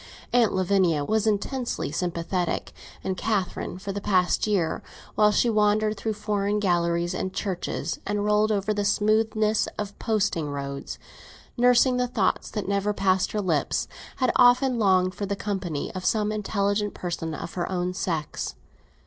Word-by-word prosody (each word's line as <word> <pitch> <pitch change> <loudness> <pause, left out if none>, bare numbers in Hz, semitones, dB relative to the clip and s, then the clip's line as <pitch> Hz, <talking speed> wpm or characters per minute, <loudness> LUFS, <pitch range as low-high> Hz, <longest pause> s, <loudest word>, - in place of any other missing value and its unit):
Aunt 240 -3 +4
Lavinia 185 -5 +2
was 220 +3 +1
intensely 235 +4 -1
sympathetic, 175 0 -2 0.3
and 190 - -1
Catherine, 190 -3 -2
for 195 +2 -5
the 200 +1 -4
past 185 0 +2
year, 190 -6 0 0.3
while 210 0 +4
she 225 - +2
wandered 215 -1 +2
through 220 +1 -2
foreign 210 -1 -1
galleries 175 -2 +1
and 185 0 -3
churches, 190 -4 -3
and 205 0 -1
rolled 210 +1 +3
over 205 0 0
the 205 0 -1
smoothness 215 +1 +2
of 205 -1 -5
posting 200 -9 0
roads, 140 -1 -5 0.6
nursing 250 +1 +4
the 250 0 +1
thoughts 220 -6 0
that 210 -4 -4
never 200 +1 0
passed 190 -1 +1
her 210 - 0
lips, 165 -7 0 0.3
had 255 -2 +1
often 250 0 +5
longed 185 -3 +3
for 200 - -4
the 200 - -1
company 190 -8 -3
of 185 -1 -5
some 210 +1 +1
intelligent 205 0 -1
person 165 -3 -4
of 165 - -7
her 180 +1 -3
own 180 0 -1
sex. 165 -5 -3
200 Hz, 155 wpm, -25 LUFS, 180-215 Hz, 0.6 s, often